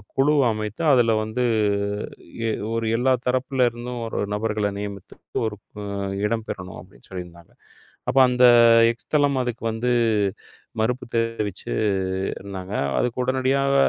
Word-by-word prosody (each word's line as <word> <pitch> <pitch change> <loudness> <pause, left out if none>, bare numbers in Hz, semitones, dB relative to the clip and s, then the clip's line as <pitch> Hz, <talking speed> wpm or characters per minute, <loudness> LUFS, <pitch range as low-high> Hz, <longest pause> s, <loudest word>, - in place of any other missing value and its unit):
குழு 145 +3 +3 0.2
அமைத்து 110 +7 -4
அதுல 120 -3 +4
வந்து 110 +3 -2 1.1
எ - - +1 0.2
ஒரு 115 0 -1
எல்லா 130 +2 +3
தரப்புல 130 0 +1
இருந்தும் 120 +1 -6
ஒரு 115 - -4
நபர்கள 105 -1 0
நியமித்து 100 -2 -7 0.3
ஒரு 105 - -5 0.7
இடம் 110 +1 -1
பெறணும் 90 -1 -6
அப்டின்னு - - -19
சொல்லி 90 -1 -5
இருந்தாங்க. 85 -1 -17 0.6
அப்ப 135 - +2
அந்த 125 0 +5 0.5
எக்ஸ் 115 - -15
தளம் 145 -3 +3
அதுக்கு 120 -2 -5
வந்து 125 +2 0 0.9
மறுப்பு 125 +3 -1
தெரிவிச்சு 115 - -2 0.7
இருந்தாங்க. 95 0 -7 0.2
அதுக்கு 125 +1 0
உடனடியாக 135 +2 +1
115 Hz, 125 wpm, -23 LUFS, 105-125 Hz, 1.1 s, அந்த